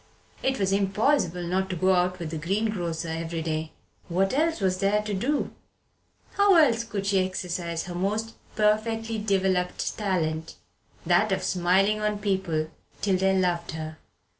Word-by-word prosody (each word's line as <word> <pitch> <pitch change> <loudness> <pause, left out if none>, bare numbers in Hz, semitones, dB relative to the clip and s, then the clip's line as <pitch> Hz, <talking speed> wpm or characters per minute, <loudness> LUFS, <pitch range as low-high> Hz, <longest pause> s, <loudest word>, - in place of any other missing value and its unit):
It 265 0 0
was 195 -1 +1
impossible 195 - +1
not 190 +2 -1
to 185 - -2
go 185 +3 +3
out 180 0 +1
with 170 -3 -5
the 160 - -3
greengrocer 175 -2 -1
every 165 0 -3
day. 155 0 -2 0.4
What 190 +3 +1
else 320 +2 +1
was 185 -2 0
there 205 +2 +2
to 210 -1 -3
do? 260 +10 0 0.8
How 400 -1 +4
else 250 -9 +5
could 205 -4 -4
she 195 -2 +3
exercise 175 -2 -3
her 180 - -7
most 210 +5 -1 0.2
perfectly 220 +1 +1
developed 190 -3 0
talent 160 -6 -1 0.5
that 180 +5 +3
of 190 -1 0
smiling 190 +4 +2
on 210 0 0
people 190 -6 -1 0.3
till 195 -2 +3
they 190 +1 +2
loved 175 -3 0
her? 155 -1 -6
190 Hz, 155 wpm, -26 LUFS, 175-210 Hz, 0.8 s, else